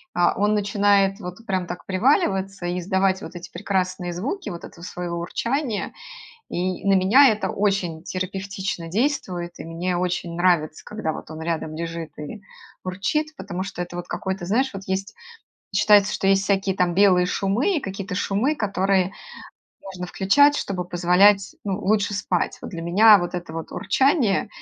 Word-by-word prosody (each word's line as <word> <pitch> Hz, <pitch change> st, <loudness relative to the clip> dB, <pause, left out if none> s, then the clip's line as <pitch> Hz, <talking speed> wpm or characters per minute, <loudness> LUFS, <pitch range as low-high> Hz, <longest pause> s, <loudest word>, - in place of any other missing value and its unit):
а, 175 Hz, 0 st, +3 dB
он 210 Hz, +1 st, +2 dB
начинает 200 Hz, -1 st, +2 dB
вот 185 Hz, +4 st, -8 dB
прям 185 Hz, -2 st, -1 dB
так 175 Hz, -, -7 dB
приваливаться 195 Hz, -, +1 dB
и 175 Hz, +1 st, -1 dB
издавать 190 Hz, +1 st, +1 dB
вот 170 Hz, +2 st, -9 dB
эти 175 Hz, +1 st, -9 dB
прекрасные 185 Hz, -3 st, -2 dB
звуки 275 Hz, -, -4 dB
вот 170 Hz, -, -7 dB
этого 170 Hz, -, -11 dB
своего 175 Hz, -1 st, -4 dB
урчания. 230 Hz, -, -2 dB, 0.6 s
И 185 Hz, +2 st, -3 dB
на 195 Hz, -, +5 dB
меня 215 Hz, +9 st, +6 dB
это 215 Hz, -1 st, 0 dB
очень 195 Hz, -6 st, -1 dB
терапевтично 190 Hz, -1 st, -4 dB
действует, 185 Hz, -, -2 dB
и -, -, -7 dB
мне 175 Hz, +2 st, -2 dB
очень 175 Hz, -1 st, -2 dB
нравится, 170 Hz, -4 st, +1 dB
когда 210 Hz, -7 st, -3 dB
вот -, -, -9 dB
он 160 Hz, 0 st, -7 dB
рядом 160 Hz, -1 st, -3 dB
лежит 165 Hz, -1 st, -5 dB
и 150 Hz, +8 st, -7 dB, 0.4 s
урчит, 300 Hz, +12 st, -2 dB
потому 180 Hz, +2 st, -5 dB
что 190 Hz, -2 st, -5 dB
это 175 Hz, -, -7 dB
вот 175 Hz, -, -6 dB
какой-то 190 Hz, -3 st, -4 dB
знаешь, 255 Hz, +8 st, +1 dB
вот 195 Hz, 0 st, -7 dB
есть 195 Hz, +3 st, -3 dB, 0.6 s
считается, 210 Hz, 0 st, +5 dB
что 195 Hz, -, -1 dB
есть 195 Hz, 0 st, +3 dB
всякие 195 Hz, -1 st, +1 dB
там 175 Hz, -1 st, +1 dB
белые 185 Hz, -2 st, +5 dB
шумы 220 Hz, -, 0 dB
и -, -, 0 dB
какие-то 195 Hz, -2 st, -5 dB
шумы, 205 Hz, +10 st, 0 dB
которые 195 Hz, -4 st, +1 dB, 0.7 s
можно 185 Hz, -2 st, -7 dB
включать, 285 Hz, +12 st, +4 dB
чтобы 180 Hz, -3 st, -3 dB
позволять, 185 Hz, +3 st, +3 dB
ну, 195 Hz, -1 st, -2 dB
лучше 205 Hz, 0 st, +1 dB
спать. 185 Hz, -3 st, -1 dB
Вот -, -, -6 dB
для 170 Hz, -, -6 dB
меня 205 Hz, +5 st, +7 dB
вот 175 Hz, 0 st, -4 dB
это 175 Hz, -2 st, -5 dB
вот 165 Hz, 0 st, -6 dB
урчание 260 Hz, -, +2 dB
190 Hz, 165 wpm, -23 LUFS, 175-205 Hz, 0.7 s, меня